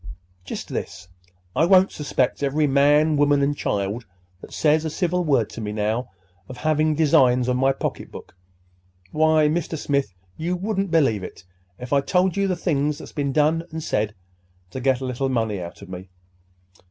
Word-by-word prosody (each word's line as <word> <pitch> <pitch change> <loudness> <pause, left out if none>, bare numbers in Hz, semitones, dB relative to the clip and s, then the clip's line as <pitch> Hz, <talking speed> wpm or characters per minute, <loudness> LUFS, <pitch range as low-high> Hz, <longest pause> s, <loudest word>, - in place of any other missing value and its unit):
"Just 90 - -7
this. 90 0 -6 0.5
I - - +3
won't 190 +1 +5
suspect 140 -3 -1
every 145 +2 +1
man, 145 +2 +3
woman, 145 -1 +3
and 145 +1 +1
child 105 0 -2 0.3
that - - -12
says 155 0 +2
a 160 - -2
civil 180 +2 -1
word 135 -9 +2
to 115 - -7
me 105 -1 -4
now 110 +4 -2 0.4
of 130 - -8
having 155 +1 +1
designs 130 -5 +3
on 125 0 +1
my 135 +1 +3
pocketbook. 135 - -6 0.8
Why, 155 0 +3
Mr. 160 +1 -2
Smith, 140 -6 -1 0.3
you 170 +3 -2
wouldn't 195 +1 -2
believe 140 - +2
it, 95 - -10 0.3
if 125 +4 -6
I 140 - +4
told 180 +6 +1
you, 200 0 +1
the 185 - 0
things 150 -4 0
that's - - -10
been 140 -2 -2
done 155 +3 +2
and 160 -1 -6
said 105 -3 -1 0.6
to 130 - -5
get 130 0 +1
a - - -3
little 130 +1 -2
money 110 -6 -1
out 85 +3 -9
of 95 - -12
me. 95 +1 -8
140 Hz, 175 wpm, -23 LUFS, 125-160 Hz, 0.8 s, won't